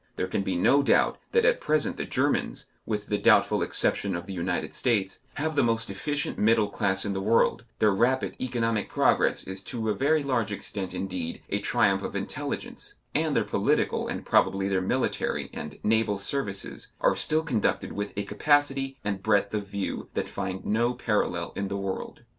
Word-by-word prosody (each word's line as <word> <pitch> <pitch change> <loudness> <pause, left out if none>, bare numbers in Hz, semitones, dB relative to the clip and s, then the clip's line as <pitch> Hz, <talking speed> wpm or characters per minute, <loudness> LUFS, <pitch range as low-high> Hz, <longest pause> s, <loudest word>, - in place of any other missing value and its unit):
There - - -1
can 95 - -1
be 95 -2 -2
no 135 +11 +4
doubt 140 - +3
that 465 -1 +3
at - - +3
present 155 -1 +2
the - - -4
Germans, - - 0 0.2
with 105 -2 -2
the 105 -1 -1
doubtful - - +4
exception 100 -3 +2
of 85 0 -5
the 100 - -6
United 90 0 -2
States, 105 -7 0 0.2
have 155 +1 -2
the 140 - +4
most 115 0 0
efficient 145 -2 -3
middle 110 -1 +3
class 95 -2 +1
in 100 - -1
the 95 - -2
world, 115 +3 +2
their 105 - +4
rapid 125 +6 +1
economic 115 -4 -1
progress - - +2
is 95 0 -6
to 110 -2 -3
a - - +2
very 150 +5 +2
large 120 -6 0
extent, 100 -2 -4
indeed, 90 -4 -4
a - - +1
triumph - - +2
of - - -5
intelligence, - - -5 0.2
and - - +1
their - - +3
political - - 0
and - - -5
probably 95 0 +2
their 95 -1 +1
military 95 - -1
and 75 - -7
naval 110 -1 +2
services 100 -1 -3
are - - +3
still 155 +1 +1
conducted 125 -10 0
with 100 0 -4
a 100 - 0
capacity 135 -1 +1
and 100 -2 -2
breadth 100 -1 +2
of 105 -2 -2
view 100 0 -4
that - - -1
find 95 -1 -5
no 120 +3 +1
parallel 105 -7 -1
in 100 - -2
the 100 0 -3
world. 100 -1 -5
105 Hz, 185 wpm, -27 LUFS, 95-125 Hz, 0.2 s, no